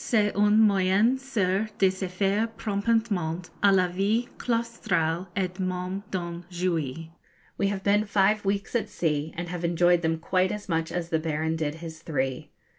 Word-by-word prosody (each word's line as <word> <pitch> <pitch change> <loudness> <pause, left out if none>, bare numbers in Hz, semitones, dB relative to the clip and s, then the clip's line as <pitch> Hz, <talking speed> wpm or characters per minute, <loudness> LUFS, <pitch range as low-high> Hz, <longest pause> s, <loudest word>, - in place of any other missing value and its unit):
C'est 210 -3 +2
un 210 +1 +4
moyen 205 +3 +4
sûr 215 -6 0
de 190 -1 +4
se 190 0 -4
faire 200 +4 0
promptement 200 -5 0 0.2
à 200 - +6
la 185 -2 +4
vie 200 +7 0
claustrale 210 -8 -1
et 185 -2 0
même 185 +1 -2
d'en 170 -2 -4
jouir.' 165 -4 -2 0.5
We 200 - +2
have 195 -1 -3
been 205 +1 +3
five 205 +1 +2
weeks 200 0 -1
at 235 - 0
sea, 155 -2 -1
and 175 +1 -3
have 175 -1 -5
enjoyed 175 +1 +3
them 165 -1 0
quite 185 +3 +1
as 210 0 -5
much 165 -2 -1
as 175 -1 -3
the 160 - +1
Baron 160 0 -1
did 155 -2 -2
his 160 -1 -9
three. 135 -5 -2
185 Hz, 170 wpm, -26 LUFS, 165-205 Hz, 0.5 s, à